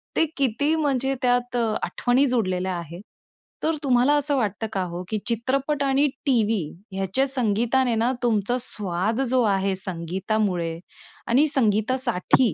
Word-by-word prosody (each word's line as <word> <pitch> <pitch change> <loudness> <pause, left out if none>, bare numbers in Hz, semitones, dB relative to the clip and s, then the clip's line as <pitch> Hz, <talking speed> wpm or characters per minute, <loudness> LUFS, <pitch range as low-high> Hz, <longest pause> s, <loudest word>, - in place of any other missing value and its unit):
ते - - +3
किती 280 +4 +1
म्हणजे 270 -3 0
त्यात 245 0 +1
अ, 235 - +2 0.2
आठवणी 250 +3 +2
जोडलेल्या 185 -7 0
आहेत. 170 +1 -8 0.6
तर 320 +1 +1
तुम्हाला 255 +1 +3
असं 290 0 +1
वाटतं 220 -1 -1
का 195 - 0
हो, 175 +1 -5
की 220 - -1
चित्रपट 270 +5 0
आणि 275 +1 +3 0.2
टीव्ही 225 -6 +2 0.3
ह्याच्या 195 +8 0
संगीताने 240 0 +1
ना, 230 +3 +1
तुमचा 230 0 +1
स्वाद 210 +1 -1
जो 255 0 +3
आहे 195 0 0
संगीतामुळे 185 -1 -2 0.5
आणि 270 +6 +4
संगीतासाठी 235 - +2
235 Hz, 135 wpm, -24 LUFS, 195-265 Hz, 0.6 s, आणि